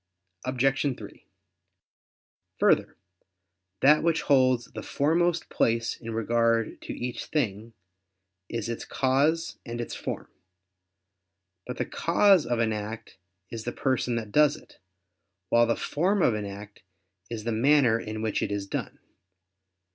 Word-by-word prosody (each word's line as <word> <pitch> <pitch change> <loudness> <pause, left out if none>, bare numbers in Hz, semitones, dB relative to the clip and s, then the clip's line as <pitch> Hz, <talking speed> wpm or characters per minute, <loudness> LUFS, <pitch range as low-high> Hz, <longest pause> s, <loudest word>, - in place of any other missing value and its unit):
Obj. 135 +1 +1
3: - - -12 1.3
Further, - - +2 0.8
that 150 +3 +6
which 165 -1 +1
holds 130 -4 +3
the - - -8
foremost 165 +3 +1
place 115 0 +1
in 115 - -9
regard 115 0 +1
to - - -6
each 120 -1 -4
thing, 115 -6 -2 0.8
is 115 -2 -3
its 115 -1 -4
cause 145 +5 +1
and 120 -1 -6
its 120 - -4
form. - - -5 1.4
But 125 - -5
the - - -1
cause 185 +1 +3
of 120 0 0
an 115 -1 +1
act 105 -1 -7 0.3
is 115 -1 -5
the 120 - -3
person 125 -1 0
that 110 -3 -4
does 150 +2 +4
it; - - -17 0.7
while 120 0 +4
the 115 - +2
form 185 +5 0
of 120 - +4
an 105 -1 -3
act 100 +1 -10 0.5
is 115 -2 -5
the 115 - -2
manner 120 0 +4
in 110 0 -5
which 110 -2 -1
it - - -2
is 100 -1 -2
done. - - -5
120 Hz, 140 wpm, -27 LUFS, 115-145 Hz, 1.4 s, that